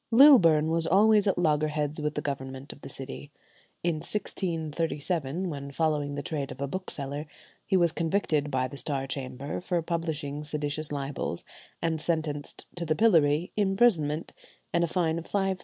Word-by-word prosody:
Lilburne 190 - +7
was 165 0 +1
always 210 +3 +5
at 195 - +2
loggerheads 150 -2 +1
with 150 0 -1
the 150 - -2
government 135 -1 -5
of - - -18
the - - -8
city. 135 +1 -7 0.5
In 170 -2 +1
1637, 165 -2 -2
when 140 -4 -5
following 145 -1 0
the 145 - -4
trade 145 -3 -3
of - - -9
a 140 - -1
bookseller, 145 -3 -4 0.4
he 190 - +3
was 170 -2 +4
convicted 160 -3 0
by 130 -2 0
the 140 - -9
Star 135 -2 -2
Chamber 135 +2 -4
for 180 -1 0
publishing 155 -4 -3
seditious 150 0 -3
libels, 140 -11 -3 0.4
and 160 -2 0
sentenced 155 -3 -2
to 175 - -2
the 155 -1 +1
pillory, 165 -5 +4
imprisonment, 195 -7 +2 0.4
and 170 - +3
a - - +2
fine 165 -1 0
of 165 - -10
£5,000. 195 -2 0
155 Hz, 160 wpm, -28 LUFS, 145-175 Hz, 0.5 s, Lilburne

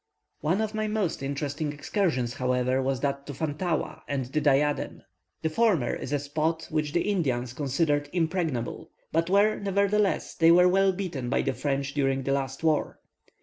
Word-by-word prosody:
One 180 +7 +1
of 220 0 -2
my 215 0 -1
most 210 -8 -1
interesting 145 +2 -2
excursions, 145 - -1
however, 125 0 +1
was 135 -1 -1
that 140 0 -2
to 145 - -6
Fantaua 160 +3 -2
and 140 -3 -2
the 145 +5 -1
Diadem. 145 0 +1 0.4
The 160 - +1
former 185 - +2
is 135 - -5
a 145 - +2
spot 155 +3 -2
which 150 -1 -1
the 170 - +2
Indians 130 - -1
considered 145 +1 0
impregnable; 165 -8 -2 0.2
but 165 +2 +1
where, 205 +3 +3
nevertheless, 200 0 +1
they 165 0 +4
were 180 +2 +7
well 195 +1 +4
beaten 175 -10 -4
by - - +1
the 135 - 0
French 140 0 -2
during 135 -2 +1
the 135 - -1
last 135 +1 -3
war. 155 -2 +1
150 Hz, 170 wpm, -27 LUFS, 135-180 Hz, 0.4 s, were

